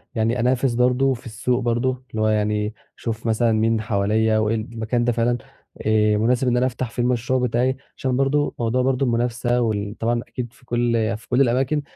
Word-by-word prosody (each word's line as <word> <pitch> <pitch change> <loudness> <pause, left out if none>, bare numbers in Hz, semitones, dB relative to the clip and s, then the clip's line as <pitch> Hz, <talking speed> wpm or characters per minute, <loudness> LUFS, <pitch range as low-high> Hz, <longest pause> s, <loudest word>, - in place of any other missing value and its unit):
يعني 115 +2 +1
أنافِس 125 +1 +1
برضه 125 +2 +2
في 120 - -10
السُّوق 120 +2 -1
برضه، 125 +1 -1
اللي 110 - -2
هو 110 - +3
يعني 105 0 0 0.2
أشُوف 115 -1 -5
مثلًا 115 +1 +2
مين 110 0 +2
حواليَّا، 110 +1 +1
وإيه 110 +1 +1
المكان 115 +1 -2
ده 120 - +2
فعلًا 120 +1 +1 0.5
آآ 105 -1 +3
مُناسب 125 +4 +1
إن 125 0 +2
أنا 125 - +2
أفتح 130 -1 -2
فيه 120 - -3
المشروع 125 +1 +1
بتاعي، 125 +2 +1 0.2
عشان 130 -1 -1
برضه 140 +2 +1
موضوع 120 +2 +1
برضه 135 +1 +1
المُنافسة 120 0 0
وال 105 -2 -1
طبعًا 120 +1 0
أكيد 120 0 -6
في 125 - -23
كُلّ 115 -2 0
في 110 - -19
كُلّ 125 +2 +2
الأماكن 135 +4 +2
120 Hz, 190 wpm, -22 LUFS, 110-125 Hz, 0.5 s, هو